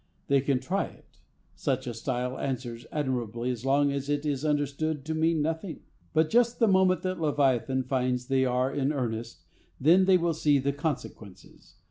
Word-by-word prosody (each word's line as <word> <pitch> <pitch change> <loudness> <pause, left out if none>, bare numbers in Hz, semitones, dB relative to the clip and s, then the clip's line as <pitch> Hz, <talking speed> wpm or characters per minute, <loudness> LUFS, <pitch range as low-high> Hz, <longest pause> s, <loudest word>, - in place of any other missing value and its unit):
They 140 -1 +4
can 135 -1 +1
try 180 +10 -1
it. - - -17 0.3
Such 130 -3 -2
a 120 - -4
style 125 +2 -3
answers 120 -3 -4
admirably 125 -4 -2
as 120 -2 -6
long 140 +1 +3
as 140 0 -3
it 145 +1 -1
is 145 -2 -1
understood 150 0 -1
to 160 - -2
mean 160 -1 +1
nothing. 165 +3 -3 0.3
But 160 0 +2
just 235 0 +3
the 230 - +3
moment 190 -2 +3
that 185 -2 -2
Leviathan 135 -3 +1
finds 125 -1 -1
they 135 0 +2
are 130 +1 +1
in 140 +1 0
earnest, 115 -4 -4 0.4
then 175 +7 +5
they 190 -1 +5
will 170 -1 0
see 150 -2 +3
the 140 +1 0
consequences. 140 - -6
140 Hz, 175 wpm, -28 LUFS, 125-160 Hz, 0.4 s, then